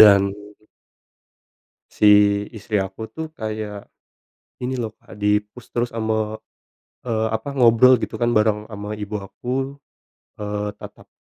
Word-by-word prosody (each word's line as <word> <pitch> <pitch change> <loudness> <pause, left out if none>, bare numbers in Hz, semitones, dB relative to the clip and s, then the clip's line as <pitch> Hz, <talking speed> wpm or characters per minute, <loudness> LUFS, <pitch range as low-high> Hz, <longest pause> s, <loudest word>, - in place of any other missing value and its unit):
Dan 100 -2 +8 1.6
si 105 - +2 0.5
istri 105 -1 -1
aku 95 +2 -4
tuh 160 0 -5
kayak 110 -2 -5 0.7
ini 125 +1 -1
loh, 110 -2 -4
Kak, - - -16
di-push 105 +3 0
terus 120 0 0
ama, 110 -1 -1 0.7
eee, 110 -2 0
apa, 110 +5 -5
ngobrol 125 0 +6
gitu - - -3
kan 120 - +3
bareng 105 0 +2
ama 105 0 -6
ibu 105 0 -5
aku. 130 +7 -4 0.6
Eee, 105 0 -3
tatap, - - -12
110 Hz, 125 wpm, -22 LUFS, 105-115 Hz, 1.6 s, Dan